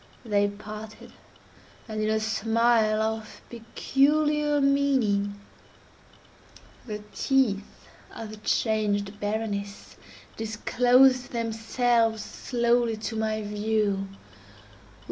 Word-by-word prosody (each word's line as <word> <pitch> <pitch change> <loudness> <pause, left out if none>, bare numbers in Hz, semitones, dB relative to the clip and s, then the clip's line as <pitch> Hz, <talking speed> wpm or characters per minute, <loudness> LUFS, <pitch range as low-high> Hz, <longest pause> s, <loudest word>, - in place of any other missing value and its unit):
They 205 -2 +2
parted; 215 +1 -9 0.7
and 215 -1 -4
in 215 - 0
a 220 0 +2
smile 225 0 +2
of 220 0 -4
peculiar 295 +5 +1
meaning, 260 -8 +1 1.5
the 210 -1 -6
teeth 230 -7 0 0.3
of 220 -1 -8
the 215 - -9
changed 210 -2 0
Berenice 205 -1 -4 0.4
disclosed 250 +4 +3
themselves 230 0 +1
slowly 235 -2 0
to 220 +1 -5
my 220 0 -1
view. 210 -1 -1
220 Hz, 85 wpm, -26 LUFS, 210-240 Hz, 1.5 s, disclosed